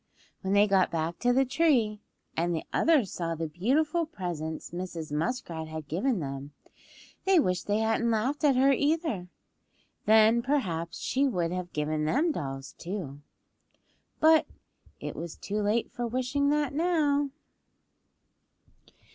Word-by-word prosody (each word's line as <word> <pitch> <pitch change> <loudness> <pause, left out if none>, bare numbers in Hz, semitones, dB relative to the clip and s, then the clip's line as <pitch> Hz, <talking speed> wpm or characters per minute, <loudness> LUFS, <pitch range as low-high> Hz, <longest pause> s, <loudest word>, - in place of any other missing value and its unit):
When 190 0 -1
they 205 +1 +6
got 195 -2 +3
back 165 0 -2
to 245 - +2
the 265 +2 +3
tree, 255 -7 +2 0.4
and 170 +1 0
the 160 - -3
others 295 - +3
saw 165 -1 -3
the 165 0 -3
beautiful 295 - +1
presents 165 - -5
Mrs. 175 -3 -5
Muskrat 165 0 -2
had 155 -2 -7
given 210 - 0
them 140 -1 -6 0.7
they 380 -2 +5
wished 180 - 0
they 205 +1 +1
hadn't 225 +1 +1
laughed 245 +7 0
at 285 -3 +5
her 270 +2 +5
either; 285 - 0 0.8
then 220 +2 +6
perhaps 180 - -1
she 275 +2 +1
would 175 -9 -1
have 180 -1 -4
given 150 0 -1
them 300 - +2
dolls 135 - -5
too. 170 -7 -5 1.0
But 315 0 +5 0.5
it - - -5
was 170 -1 -6
too 210 +1 -3
late 210 +3 0
for 240 -1 -3
wishing 255 +4 0
that 295 -2 +1
now. 295 -3 +2
210 Hz, 140 wpm, -28 LUFS, 165-275 Hz, 1.0 s, they